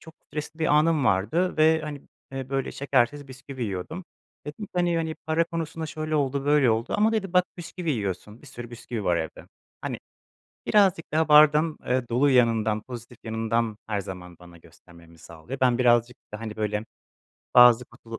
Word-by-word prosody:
çok 160 Hz, -, -14 dB
stresli 150 Hz, +2 st, -6 dB
bir 160 Hz, -, 0 dB
anım 150 Hz, -1 st, +3 dB
vardı 110 Hz, -, +1 dB
ve, 160 Hz, +1 st, +4 dB
hani, 150 Hz, -2 st, -6 dB, 0.3 s
eee, 135 Hz, -1 st, -5 dB
böyle 135 Hz, -1 st, -2 dB
şekersiz 140 Hz, 0 st, 0 dB
bisküvi 130 Hz, 0 st, -8 dB
yiyordum. 110 Hz, -, -5 dB, 0.4 s
Dedim 150 Hz, +9 st, -6 dB
ki -, -, -34 dB
hani 175 Hz, -1 st, +1 dB
hani 160 Hz, -1 st, -2 dB
para 160 Hz, +1 st, +2 dB
konusunda 165 Hz, -1 st, -5 dB
şöyle 155 Hz, 0 st, -4 dB
oldu, 140 Hz, -2 st, 0 dB
böyle 145 Hz, -4 st, +4 dB
oldu 115 Hz, +2 st, -1 dB
ama 215 Hz, +2 st, +3 dB
dedi: 195 Hz, -5 st, -2 dB
“Bak, 180 Hz, -1 st, +4 dB
bisküvi 170 Hz, 0 st, -5 dB
yiyorsun. 105 Hz, -2 st, -4 dB
Bir -, -, -15 dB
sürü 120 Hz, -3 st, -9 dB
bisküvi 120 Hz, -2 st, -6 dB
var, 90 Hz, -2 st, +2 dB
evde.” 80 Hz, -1 st, -5 dB, 0.3 s
Hani, -, -, -4 dB, 0.7 s
birazcık 190 Hz, -7 st, +2 dB
daha 160 Hz, 0 st, +2 dB
bardağın, 150 Hz, +1 st, +6 dB
eee, 125 Hz, -1 st, 0 dB
dolu 125 Hz, +5 st, +3 dB
yanından, 115 Hz, -4 st, +2 dB
pozitif 120 Hz, 0 st, -10 dB
yanından, 115 Hz, 0 st, -1 dB
her 105 Hz, -2 st, -1 dB
zaman 90 Hz, -3 st, -9 dB
bana 85 Hz, -1 st, -15 dB
göstermemi 85 Hz, 0 st, -19 dB
sağlıyor. 85 Hz, +11 st, -9 dB
Ben 125 Hz, -2 st, +3 dB
birazcık 120 Hz, -1 st, +3 dB, 0.2 s
da, 105 Hz, -, -5 dB
hani, 110 Hz, -2 st, -6 dB
böyle, 105 Hz, 0 st, -2 dB, 0.7 s
bazı 125 Hz, -1 st, +7 dB
kutlu 115 Hz, -1 st, -11 dB
130 Hz, 175 wpm, -25 LUFS, 110-155 Hz, 0.7 s, bazı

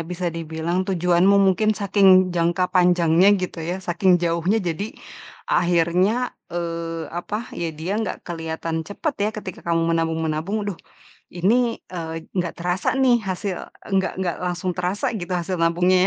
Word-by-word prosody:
bisa 175 Hz, +1 st, -3 dB
dibilang 165 Hz, +2 st, -2 dB
tujuanmu 180 Hz, +1 st, +3 dB
mungkin 200 Hz, +2 st, +3 dB
saking 190 Hz, -2 st, +5 dB
jangka 175 Hz, +1 st, +1 dB
panjangnya 175 Hz, 0 st, +4 dB
gitu 185 Hz, -3 st, -4 dB
ya, 170 Hz, +3 st, -2 dB
saking 180 Hz, +1 st, +3 dB
jauhnya 175 Hz, +4 st, +1 dB
jadi 200 Hz, +7 st, -4 dB, 0.6 s
akhirnya, 180 Hz, +7 st, +2 dB, 0.2 s
eee, 165 Hz, -1 st, -4 dB
apa, 205 Hz, +7 st, -5 dB
ya 170 Hz, -, -3 dB
dia 170 Hz, +5 st, -3 dB
nggak 220 Hz, -, -4 dB
kelihatan 165 Hz, -1 st, -3 dB
cepet 285 Hz, +9 st, -3 dB
ya -, -, +2 dB
ketika 190 Hz, -4 st, -7 dB
kamu 165 Hz, 0 st, +1 dB
menabung-menabung, 160 Hz, +3 st, -1 dB
"Aduh, 200 Hz, -4 st, -4 dB, 0.6 s
ini, 230 Hz, +6 st, +1 dB
eee, 165 Hz, -2 st, -5 dB
nggak 175 Hz, -3 st, -2 dB
terasa 180 Hz, +2 st, -1 dB
nih 255 Hz, -3 st, +4 dB
hasil 185 Hz, 0 st, -2 dB, 0.4 s
nggak 190 Hz, 0 st, +1 dB
nggak 180 Hz, -2 st, -1 dB
langsung 180 Hz, +1 st, -2 dB
terasa 180 Hz, +5 st, -1 dB
gitu 185 Hz, -5 st, -5 dB
hasil 180 Hz, +1 st, -2 dB
nabungnya 175 Hz, +2 st, +3 dB
180 Hz, 140 wpm, -22 LUFS, 165-190 Hz, 0.6 s, saking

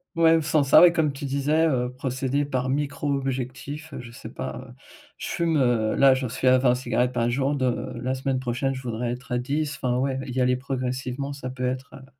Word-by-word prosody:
Ouais, 165 Hz, -1 st, +5 dB
sans 155 Hz, -1 st, +2 dB
ça, 170 Hz, +6 st, +8 dB
comme 160 Hz, -4 st, +1 dB
tu 140 Hz, +1 st, -7 dB
disais: 145 Hz, +4 st, +1 dB
«Heu, 125 Hz, -3 st, 0 dB
procéder 130 Hz, +1 st, -1 dB
par 130 Hz, -2 st, -2 dB
micro-objectifs», 140 Hz, +1 st, -3 dB
heu, 135 Hz, -, -5 dB
je 120 Hz, -1 st, -9 dB
sais -, -, -10 dB
pas. -, -, -5 dB
Heu, -, -, -12 dB, 0.4 s
je -, -, -6 dB
fume, 165 Hz, -2 st, 0 dB
heu, 120 Hz, -5 st, +2 dB
là, 135 Hz, -1 st, +6 dB
j'en 130 Hz, -2 st, -2 dB
suis 130 Hz, +2 st, -2 dB
à 130 Hz, 0 st, +7 dB
20 125 Hz, -1 st, +3 dB
cigarettes 125 Hz, 0 st, 0 dB
par 120 Hz, -1 st, 0 dB
jour 135 Hz, +3 st, 0 dB
de 130 Hz, -2 st, -1 dB
la 130 Hz, +1 st, -1 dB
semaine 130 Hz, 0 st, -1 dB
prochaine, 130 Hz, +2 st, -1 dB
je 130 Hz, -, -6 dB
voudrais 120 Hz, -1 st, -3 dB
être 125 Hz, 0 st, -6 dB
à 125 Hz, -, +1 dB
10. 145 Hz, +3 st, -2 dB
Enfin 125 Hz, -1 st, -1 dB
ouais, 130 Hz, 0 st, 0 dB
y 130 Hz, +1 st, -3 dB
aller 125 Hz, 0 st, +3 dB
progressivement, 130 Hz, +1 st, -3 dB
ça 135 Hz, -2 st, -6 dB
peut 125 Hz, 0 st, -4 dB
être, 130 Hz, +2 st, -4 dB
heu 130 Hz, -, -14 dB
130 Hz, 215 wpm, -25 LUFS, 125-140 Hz, 0.4 s, ça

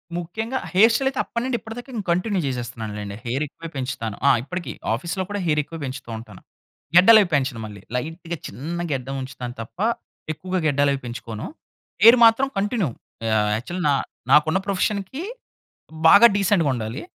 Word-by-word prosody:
ముఖ్యంగా 220 Hz, +9 st, -3 dB, 0.2 s
hair 220 Hz, +5 st, +6 dB
style 265 Hz, +3 st, +2 dB
అయితే 270 Hz, -, -5 dB
అప్పటినుండి 240 Hz, +1 st, -2 dB
ఇప్పటి 225 Hz, 0 st, -9 dB
దాకా 245 Hz, +2 st, -9 dB
నేను 210 Hz, -, -4 dB
కంటిన్యూ 185 Hz, +3 st, 0 dB
చేసేస్తున్నాను 120 Hz, -3 st, -4 dB
లెండి. 100 Hz, -1 st, -6 dB
హెయిర్ 130 Hz, +5 st, -1 dB
ఎక్కువే 165 Hz, +4 st, -10 dB
పెంచుతాను. 125 Hz, -5 st, -3 dB
ఆ -, -, +8 dB
ఇప్పటికి. 180 Hz, +5 st, -5 dB, 0.2 s
ఆఫీస్‌లో 170 Hz, -, -2 dB
కూడా 205 Hz, 0 st, -3 dB
హెయిర్ 150 Hz, -2 st, +2 dB
ఎక్కువ 165 Hz, +3 st, -9 dB
పెంచుతూ 130 Hz, -3 st, -6 dB
ఉంటాను. 110 Hz, -4 st, -12 dB, 0.5 s
గడ్డాలు 215 Hz, +5 st, +9 dB
అవి 190 Hz, -, 0 dB
పెంచను 130 Hz, -5 st, 0 dB
మళ్ళీ. 105 Hz, -2 st, -10 dB
లైట్‌గా 165 Hz, +5 st, -4 dB
చిన్న 155 Hz, +11 st, -5 dB
గడ్డం 135 Hz, 0 st, -3 dB
ఉంచుతాను 125 Hz, -2 st, -7 dB
తప్ప, 115 Hz, -, -11 dB, 0.6 s
ఎక్కువగా 185 Hz, +3 st, -3 dB
గడ్డాలవి 140 Hz, -1 st, +2 dB
పెంచుకోను. 115 Hz, -2 st, -6 dB, 0.6 s
హెయిర్ 230 Hz, +3 st, +10 dB
మాత్రం 230 Hz, +4 st, +5 dB
కంటిన్యూ 205 Hz, -, 0 dB, 0.5 s
ఆహ్, 105 Hz, 0 st, +1 dB
యాక్చువల్ 175 Hz, +11 st, -5 dB
నా -, -, +4 dB, 0.4 s
నాకున్న 155 Hz, +3 st, +5 dB
ప్రొఫెషన్‌కి 200 Hz, -, -1 dB, 0.9 s
బాగా 220 Hz, +8 st, +9 dB
డీసెంట్‌గా 195 Hz, -6 st, +2 dB
ఉండాలి. 115 Hz, +4 st, -4 dB
160 Hz, 155 wpm, -23 LUFS, 125-200 Hz, 0.9 s, హెయిర్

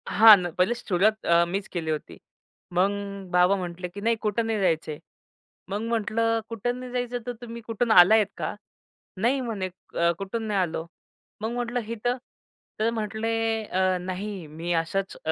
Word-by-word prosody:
हां 215 Hz, +3 st, +9 dB
ना, 180 Hz, -2 st, -2 dB
पहिलेच 190 Hz, +7 st, +2 dB
सुरुवात 210 Hz, +3 st, +2 dB
अ, 170 Hz, 0 st, +5 dB
मीच 190 Hz, +3 st, -3 dB
केली 165 Hz, -3 st, -3 dB
होती. 155 Hz, -, -5 dB, 0.6 s
मग 190 Hz, +3 st, +3 dB, 0.4 s
बाबा 180 Hz, +2 st, +5 dB
म्हटले, 180 Hz, -1 st, -5 dB
"की 200 Hz, +3 st, -9 dB
नाही 230 Hz, +2 st, +2 dB
कुठं 220 Hz, +1 st, 0 dB
नाही 220 Hz, -1 st, 0 dB
जायचं." 160 Hz, -4 st, 0 dB, 0.7 s
मग 200 Hz, +2 st, -2 dB
म्हटलं, 230 Hz, 0 st, 0 dB
"कुठं 245 Hz, +2 st, -2 dB
नाही 255 Hz, -1 st, -7 dB
जायचं 245 Hz, -1 st, -2 dB
तर 245 Hz, -, -2 dB
तुम्ही 235 Hz, -1 st, -7 dB
कुठून 230 Hz, +1 st, -1 dB
आला 185 Hz, +1 st, +8 dB
आहेत 215 Hz, -3 st, +4 dB
का?" -, -, -3 dB, 0.6 s
"नाही." 245 Hz, +7 st, +2 dB
म्हणे, 210 Hz, -6 st, -3 dB
"क 170 Hz, -1 st, -1 dB
कुठून 195 Hz, +4 st, -3 dB
नाही 205 Hz, -2 st, +1 dB
आलो." 165 Hz, -3 st, -1 dB, 0.6 s
मग 220 Hz, +1 st, -2 dB
म्हटलं 245 Hz, 0 st, -2 dB
"इथं?" 245 Hz, +3 st, -1 dB, 0.6 s
तर 220 Hz, +1 st, +2 dB
म्हटले, 220 Hz, 0 st, -2 dB, 0.3 s
"अ, 185 Hz, -1 st, +1 dB
नाही 185 Hz, 0 st, -5 dB
मी 165 Hz, +3 st, -3 dB
अशाच 170 Hz, +4 st, -1 dB
अ, 160 Hz, -, +1 dB
205 Hz, 170 wpm, -26 LUFS, 180-230 Hz, 0.7 s, हां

